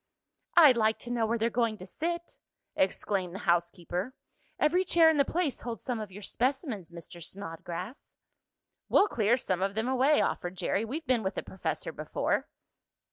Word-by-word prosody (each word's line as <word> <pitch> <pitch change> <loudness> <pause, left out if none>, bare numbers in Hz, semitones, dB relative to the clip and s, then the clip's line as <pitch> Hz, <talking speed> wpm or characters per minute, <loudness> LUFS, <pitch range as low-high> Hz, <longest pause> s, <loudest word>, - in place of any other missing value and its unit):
"I'd 295 -8 +8
like 220 -1 +3
to 240 - -6
know 230 -2 +1
where 230 +2 +1
they're 230 +1 0
going 230 -2 +1
to 185 - -9
sit!" 340 - -4 0.4
exclaimed 190 -1 0
the 195 - -7
housekeeper. 175 +5 0 0.4
"Every 350 +5 +3
chair 330 -3 +6
in 315 - 0
the 280 - +5
place 320 -1 -1
holds 235 -3 -5
some 245 -3 -2
of 210 -3 -6
your 205 +2 -10
specimens, 255 - -1
Mr. 170 0 -9
Snodgrass." 180 - -7 0.7
"We'll 410 - +5
clear 230 - +2
some 185 -7 -1
of 195 +1 0
them 220 +2 -1
away," 265 +3 +4
offered 180 +1 -1
Jerry. 200 - 0
"We've 300 +8 -5
been 250 -3 +2
with 190 -1 -2
the - - -3
professor 190 - -4
before." - - -1
225 Hz, 175 wpm, -29 LUFS, 190-265 Hz, 0.7 s, I'd